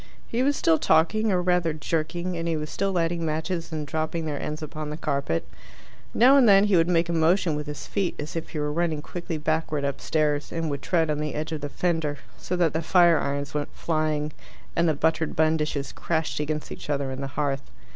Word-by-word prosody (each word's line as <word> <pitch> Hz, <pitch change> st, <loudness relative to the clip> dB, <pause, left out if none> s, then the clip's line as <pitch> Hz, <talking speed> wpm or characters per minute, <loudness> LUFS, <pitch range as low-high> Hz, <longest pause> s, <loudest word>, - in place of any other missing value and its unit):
He 235 Hz, -, -1 dB
was 285 Hz, +2 st, +3 dB
still 160 Hz, -1 st, +3 dB
talking, 215 Hz, +7 st, +3 dB
or 180 Hz, -1 st, +1 dB
rather 175 Hz, -3 st, +2 dB
jerking, 165 Hz, +3 st, -2 dB
and 165 Hz, 0 st, -3 dB
he 165 Hz, -1 st, 0 dB
was 150 Hz, 0 st, -5 dB
still 195 Hz, 0 st, 0 dB
lighting 170 Hz, -1 st, 0 dB
matches 165 Hz, +2 st, -2 dB
and 155 Hz, -2 st, -3 dB
dropping 160 Hz, +2 st, -2 dB
their 150 Hz, -2 st, -3 dB
ends 150 Hz, +1 st, -4 dB
upon 155 Hz, 0 st, -5 dB
the 150 Hz, -, -5 dB
carpet. 140 Hz, -, -1 dB, 0.6 s
Now 260 Hz, +4 st, +6 dB
and 250 Hz, -5 st, +6 dB
then 195 Hz, 0 st, +7 dB
he 205 Hz, -2 st, +3 dB
would 165 Hz, -1 st, +4 dB
make 170 Hz, -1 st, +3 dB
a 170 Hz, -, -1 dB
motion 165 Hz, 0 st, +3 dB
with 150 Hz, 0 st, -4 dB
his 150 Hz, -1 st, -6 dB
feet 195 Hz, -3 st, -1 dB
as 150 Hz, +2 st, -5 dB
if 165 Hz, 0 st, -4 dB
he -, -, -6 dB
were 150 Hz, 0 st, -1 dB
running 160 Hz, -2 st, 0 dB
quickly 175 Hz, -2 st, -5 dB
backward 155 Hz, -1 st, -1 dB
upstairs, 145 Hz, +1 st, 0 dB
and 165 Hz, -2 st, -2 dB
would 140 Hz, -1 st, -3 dB
tread 165 Hz, -3 st, +1 dB
on 150 Hz, -, -1 dB
the 150 Hz, -1 st, -3 dB
edge 155 Hz, +2 st, -3 dB
of 155 Hz, -2 st, -3 dB
the 145 Hz, -, -4 dB
fender, 160 Hz, -3 st, -1 dB, 0.2 s
so 180 Hz, -, -4 dB
that 175 Hz, -3 st, +2 dB
the 160 Hz, -, 0 dB
fire 170 Hz, -1 st, +5 dB
irons 140 Hz, +1 st, -2 dB
went 150 Hz, -1 st, -2 dB
flying 155 Hz, -2 st, -1 dB, 0.4 s
and 170 Hz, 0 st, +3 dB
the 155 Hz, -, +1 dB
buttered 160 Hz, +1 st, 0 dB
bun 160 Hz, 0 st, +3 dB
dishes 150 Hz, -3 st, -2 dB
crashed 160 Hz, -3 st, -2 dB
against 150 Hz, 0 st, -3 dB
each -, -, -8 dB
other 140 Hz, -2 st, -1 dB
in 130 Hz, +1 st, -5 dB
the 135 Hz, -, -3 dB
hearth. 140 Hz, -2 st, -1 dB
160 Hz, 225 wpm, -26 LUFS, 150-170 Hz, 0.6 s, then